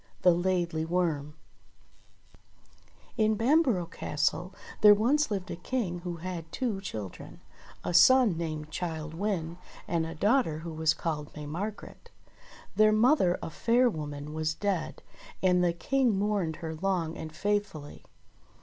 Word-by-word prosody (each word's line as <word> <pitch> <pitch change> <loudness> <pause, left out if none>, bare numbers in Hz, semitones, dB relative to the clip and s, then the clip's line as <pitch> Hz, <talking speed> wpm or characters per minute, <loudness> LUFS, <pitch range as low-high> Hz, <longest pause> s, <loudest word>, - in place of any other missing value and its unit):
THE 180 - +6
LAIDLY 175 -2 0
WORM 160 -4 -1 1.8
IN 215 -1 +3
Bamborough 240 - +2
Castle 170 +3 -2 0.3
there 210 -1 +9
once 270 +9 +2
lived 195 -4 -3
a - - -3
King 180 -2 -3
who 175 0 -5
had 165 -1 -6
two 230 -7 -2
children, 105 - -7 0.4
a - - -3
son 245 +2 +6
named 155 -2 -4
Childe 160 -2 -4
Wynde, 175 -3 -2 0.3
and 165 -2 0
a 165 - -7
daugh 235 - +3
ter 155 -1 -4
who 165 +1 -7
was 160 0 +1
called 150 -3 -3
May 150 -1 -7
Margret. 195 +9 -6 0.7
Their 215 0 +5
mother, 215 - +3
a - - -5
fair 240 +7 +2
woman, 150 -2 -6
was 155 0 -1
dead, 195 -2 -2 0.4
and 180 -1 +4
the 175 - +3
King 245 +5 +1
mourned 200 -5 0
her 160 - -3
long 170 -1 -1
and 155 - -7
faithfully. 200 -5 -3
175 Hz, 140 wpm, -29 LUFS, 160-210 Hz, 1.8 s, there